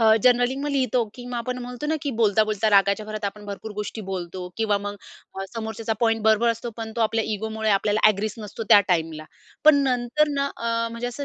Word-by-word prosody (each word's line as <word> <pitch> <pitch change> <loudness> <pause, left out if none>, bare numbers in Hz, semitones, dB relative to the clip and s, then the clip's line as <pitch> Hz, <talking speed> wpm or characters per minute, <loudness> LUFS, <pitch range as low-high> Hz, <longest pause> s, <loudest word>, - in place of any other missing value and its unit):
अ, 220 -1 +6
generally 245 0 +4
मग 290 - -2
लिहितो 255 -4 +1
की 245 - -10
आपण 250 +1 -3
म्हणतो 250 +4 -6
ना 315 - +1
की 285 - -1
बोलता-बोलता 215 0 +2
रागाच्या 200 +1 +3
भरात 215 0 -5
आपण 205 +1 -4
भरपूर 205 +2 -6
गोष्टी 210 +2 -5
बोलतो 180 -1 -5
किंवा 215 -2 +1
मग 205 0 -5 0.4
अ, 195 - -4
समोरच्याचा 225 0 -3
पॉइंट 225 -2 +2
बरोबर 220 +2 +4
असतो. 230 +1 -4
पण 225 -1 -6
तो - - -1
आपल्या 225 0 +1
इगोमुळे 220 +1 -2
आपल्याला 205 +1 +2
अग्रीच 215 0 -1
नसतो 215 +1 -7
त्या 205 - +9
टाईमला. 160 -3 0 0.4
पण 295 -2 +7
नंतर 250 +4 +1
ना 280 0 +1
अ, 230 0 -1
म्हणजे 235 +1 -4
असं 245 +4 -5
220 Hz, 205 wpm, -24 LUFS, 205-240 Hz, 0.4 s, त्या